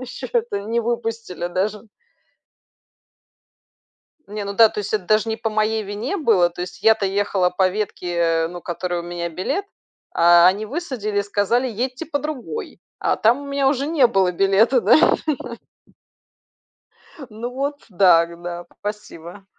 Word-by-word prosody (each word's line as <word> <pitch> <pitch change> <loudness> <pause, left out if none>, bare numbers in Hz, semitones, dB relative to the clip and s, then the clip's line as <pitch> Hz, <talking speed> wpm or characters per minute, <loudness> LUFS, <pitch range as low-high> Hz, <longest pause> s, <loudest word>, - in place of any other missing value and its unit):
Еще 255 -1 -7
это 470 - -1
не 230 +3 -2
выпустили 225 -6 -3
даже. 200 +4 -2 2.4
Не, 205 0 -5
ну 200 0 -5
да, 225 +1 +7
то - - -8
есть 210 +1 -3
это 210 -4 -1
даже 215 +4 +2
не 220 - -1
по 225 0 -3
моей 215 +1 0
вине 210 - -4
было, 210 - +3
то 175 +1 -7
есть 180 +2 -9
я-то 220 -2 +4
ехала 195 -2 +1
по 185 +1 +2
ветке, 175 -4 -1
ну, 175 0 -9
которой 175 0 -3
у - - -7
меня 175 0 -4
билет, 185 - -3 0.5
а, 170 +1 +6
они 195 +4 +2
высадили 245 - -3
и 200 - +2
сказали: 205 +5 0
"Едьте 250 +7 -4
по 290 - -2
другой". 300 - -6 0.2
А - - +1
там 240 +6 +2
у - - -9
меня 280 -1 +1
уже 275 0 0
не 300 -5 +4
было 190 -5 +1
билета, 195 +7 +3
да. 225 +2 +5 2.3
Ну 225 +3 -6
вот, 280 +3 -4
да, 180 -4 +5
г 170 0 -12
да, 175 0 -7
спасибо. 200 -3 -8
210 Hz, 155 wpm, -21 LUFS, 180-240 Hz, 2.4 s, да